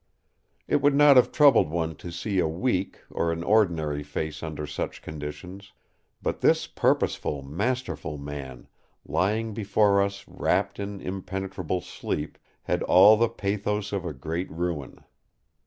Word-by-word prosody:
It - - +2
would 145 0 +4
not 145 -1 +7
have 125 - +5
troubled 140 - +5
one 80 0 -2
to 85 - -8
see 95 +3 -2
a 85 - +2
weak 95 +3 -1
or 85 - 0
an 85 0 -3
ordinary 85 -8 +2
face 75 +1 -4
under 75 -2 -5
such 75 +1 -5
conditions; 80 +6 -8 0.5
but - - -2
this - - +3
purposeful, 70 -2 0
masterful 100 - -3
man, 70 -3 -8 0.4
lying 110 +3 0
before 100 -1 +3
us 100 0 -3
wrapped - - 0
in 100 -1 -5
impenetrable 95 -1 -4
sleep, 85 -4 -5 0.2
had - - -1
all 100 +4 +7
the 115 +1 +2
pathos 105 -1 -2
of 100 -3 -1
a 85 - -3
great 80 +6 -4
ruin. 85 -4 -4
95 Hz, 140 wpm, -26 LUFS, 80-105 Hz, 0.5 s, not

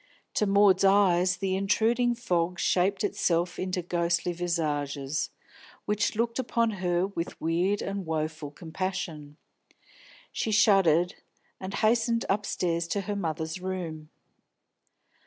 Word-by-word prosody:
To 210 - +1
Maud's 195 -1 +5
eyes 185 -2 +4
the 190 0 -1
intruding 230 +5 +2
fog 180 -6 -1
shaped 190 +2 +1
itself 175 -3 0
into 185 -1 -2
ghostly 175 0 0
visages, 150 -5 -2 0.6
which 210 +2 0
looked 230 +2 -1
upon 235 -2 +1
her 175 0 +1
with 185 -3 -5
weird 175 +5 0
and 195 0 -3
woeful 155 -2 -3
compassion. 160 -2 -5 0.9
She 220 - -2
shuddered, 190 -5 +4 0.5
and 190 +1 -5
hastened 230 +1 +2
upstairs 175 -4 0
to 200 +4 -1
her 205 +1 -4
mother's 160 -2 -3
room. 170 -5 -5
180 Hz, 115 wpm, -28 LUFS, 165-200 Hz, 0.9 s, Maud's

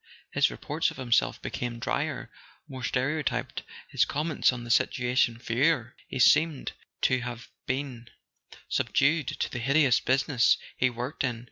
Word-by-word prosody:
His - - +3
reports - - -1
of - - -10
himself 125 -3 +1
became 120 -1 -4
drier, 115 - -3 0.4
more 130 -2 -8
stereotyped, 140 +6 -1 0.3
his - - +2
comments 155 0 +1
on 125 -1 -6
the 120 - -4
situation 125 -1 +2
fewer: 120 +1 +1
he - - -5
seemed 150 +3 +4 0.3
to 130 -1 +2
have 120 0 -7 0.2
been 130 -4 -4 0.6
subdued 150 0 +1
to - - -3
the 120 - -4
hideous 135 +1 +3
business 130 -1 +3 0.2
he 130 - +2
worked 125 +5 -4
in. 120 -4 -1
130 Hz, 140 wpm, -28 LUFS, 120-140 Hz, 0.6 s, seemed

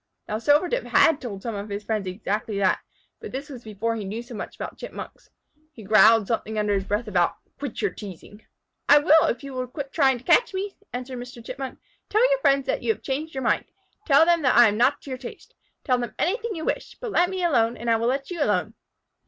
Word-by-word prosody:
Now 215 - -2
Silvertip 310 - +2
had 315 -2 +4
told 205 -7 -6
some 230 - -3
of 205 +1 -6
his 200 +1 -4
friends 215 -3 -2
exactly 205 +2 -3
that, 195 -2 +2 0.4
but - - -8
this 275 +3 -6
was 250 -3 -9
before 220 +2 -3
he 220 - -4
knew 215 +4 -5
so 240 - -11
much 215 - -6
about - - -7
Chipmunks. - - -9 0.4
He 225 - -12
growled 215 +2 +6
something 220 0 -2
under 210 -1 +1
his 195 -1 -1
breath 215 +3 -2
about 180 -4 +1 0.2
"Quit 275 -5 -5
your 200 - +1
teasing." 205 +2 -11 0.5
"I 290 - +9
will 310 +1 +5
if 240 - -2
you 275 -1 -7
will 255 -1 -3
quit 275 +2 -7
trying 270 -5 +3
to 240 - -15
catch 380 - +3
me," 390 +1 -3 0.2
answered 250 0 -5
Mr. 245 -1 -10
Chipmunk. 265 +1 -6 0.3
"Tell 445 +4 +4
your - - +3
friends 275 - +3
that - - -1
you 445 - +1
changed 295 +3 -4
your 265 - -3
mind. - - +1 0.4
Tell 280 +1 +6
them 340 -1 +3
that 255 -4 +3
I 240 -1 +9
am 205 - -2
not 245 +5 +2
to 275 - -8
your 255 - -4
taste. 245 - -10 0.3
Tell 255 -3 +1
them 240 -2 -5
anything 440 +5 -1
you 320 -1 -5
wish, - - -3
but 480 -3 -5
let 350 0 +3
me 375 -1 -3
alone 235 -8 +2
and 235 - -7
I 230 -1 +4
will 230 +1 -1
let 275 +5 -1
you 345 -3 -4
alone." 210 -1 0
245 Hz, 235 wpm, -24 LUFS, 215-290 Hz, 0.5 s, I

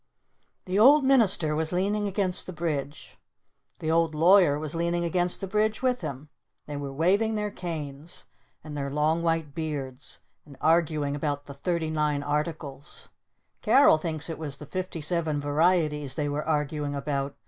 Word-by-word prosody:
The 190 +2 0
Old 280 +6 +7
Minister 200 - +3
was 160 0 -1
leaning 205 +3 0
against 190 -2 0
the 185 - -6
Bridge. 155 -3 -4 0.6
The 160 - -2
Old 165 -1 +2
Lawyer 170 -2 +5
was 150 -1 -4
leaning 170 +1 -1
against 175 +1 0
the - - -2
Bridge 215 +4 0
with 250 -3 +1
him. 145 -2 -6 0.4
They 150 - -6
were 140 -1 -5
waving 195 +10 +1
their 210 -1 -2
canes. 155 -4 -6 0.4
And 155 -2 -8
their 140 -1 -3
long 150 +3 +1
white 165 -3 -1
beards. 145 -4 -5 0.2
And 140 -3 -15
arguing 155 -3 +1
about 145 -1 -3
the 140 - -9
"Thirty 160 +2 -2
Nine 150 -2 0
Articles." 150 -1 -4 0.5
Carol 265 - +5
thinks 155 -1 -2
it 165 - -6
was 145 -3 -3
the 150 - -9
"Fifty 180 +2 -5
Seven 155 -1 +1
Varieties" 150 -2 +1
they 145 0 -1
were 145 +1 -2
arguing 150 -1 -1
about. 140 0 -3
155 Hz, 160 wpm, -27 LUFS, 145-175 Hz, 0.6 s, Old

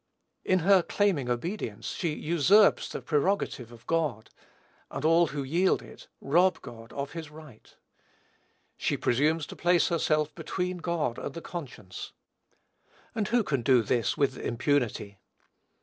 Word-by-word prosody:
In 185 - +3
her 190 +2 +5
claiming 170 -9 0
obedience, 120 - -3
she 160 -4 -2
usurps 170 +7 +4
the - - -6
prerogative 150 - 0
of 115 0 -15
God; 150 -10 -1 0.6
and - - -5
all 165 +1 +5
who 145 -1 -4
yield 170 +8 +1
it, - - -14
rob 175 +7 +3
God 115 0 -11
of 140 0 -4
his 160 -2 -7
right. 150 -7 -15 1.0
She - - 0
presumes 150 +5 +1
to - - -10
place 175 +1 +3
herself 155 -3 +1
between 180 +2 -3
God 170 -8 -2
and 140 - -6
the - - -4
conscience; 125 - -8 1.0
and 215 -3 -1
who 240 0 +2
can 140 -9 -1
do 125 -1 +4
this 115 +2 0
with 140 -2 +1
impunity? 120 -5 -1
150 Hz, 140 wpm, -28 LUFS, 125-175 Hz, 1.0 s, her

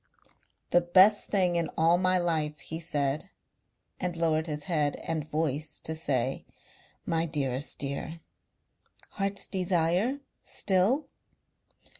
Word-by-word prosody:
"The 175 - +5
best 190 +4 +5
thing 180 -4 +2
in 165 -2 0
all 165 +2 +4
my 185 0 +3
life," 160 -4 0
he 160 - -7
said, 150 +1 -2 0.7
and 180 -2 -2
lowered 160 -1 +1
his 150 -1 -3
head 155 -6 0
and 155 -2 -3
voice 150 -1 -2
to 160 - -2
say: 135 -5 -1 0.6
"My 165 0 0
dearest 140 -3 -2
dear." 140 +4 -4 0.9
"Heart's 200 0 -2
desire 185 - +1 0.2
still 205 +10 +1
165 Hz, 115 wpm, -29 LUFS, 150-185 Hz, 0.9 s, The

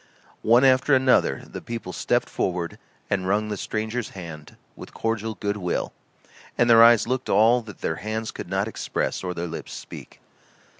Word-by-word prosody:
One 120 +3 +5
after 135 +2 +4
another 130 -1 +3
the - - -8
people 115 -6 -6
stepped - - 0
forward 85 -2 -3 0.3
and 95 -2 -1
wrung 105 +2 +1
the 105 - -2
stranger's 110 +3 -3
hand 80 -4 -9 0.2
with - - -12
cordial 115 -1 -2
good 100 +2 -2
will, 90 -3 -2 0.6
and 120 - +3
their 115 -1 +7
eyes 115 -1 +6
looked 130 +1 -2
all 115 +4 +5
that 110 -3 -12
their 80 - -2
hands 110 +1 -4
could - - -8
not 95 +2 0
express 110 - -3
or 90 -1 -3
their 85 +1 -3
lips 85 - -7
speak. - - -10
110 Hz, 170 wpm, -24 LUFS, 95-115 Hz, 0.6 s, their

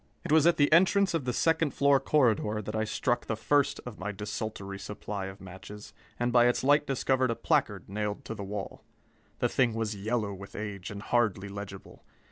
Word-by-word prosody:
It - - -4
was 160 +1 +6
at 170 - +4
the 145 +1 +4
entrance 190 +3 +4
of 160 -6 -1
the 125 - 0
second 160 +2 +1
floor 140 0 +4
corridor 115 -6 +2
that 105 +1 -5
I 110 0 0
struck 120 +2 -1
the 110 - -1
first 140 +6 +1
of 125 -4 -8
my 100 +3 -3
desultory 105 -1 -5
supply 100 -1 -5
of 95 0 -9
matches, 100 +3 -11 0.3
and 120 0 0
by 120 -1 +6
its 120 - +1
light 145 +2 +4
discovered 130 -1 +1
a 115 - 0
placard - - 0
nailed 105 +1 -3
to - - -4
the 105 - -6
wall. 100 0 -6 0.5
The - - +1
thing 120 -4 +2
was 110 -2 -2
yellow 105 0 -2
with 100 +1 -10
age 100 -3 -5
and 100 0 -7
hardly 105 -5 +1
legible. 100 -1 -9
110 Hz, 200 wpm, -29 LUFS, 100-130 Hz, 0.5 s, was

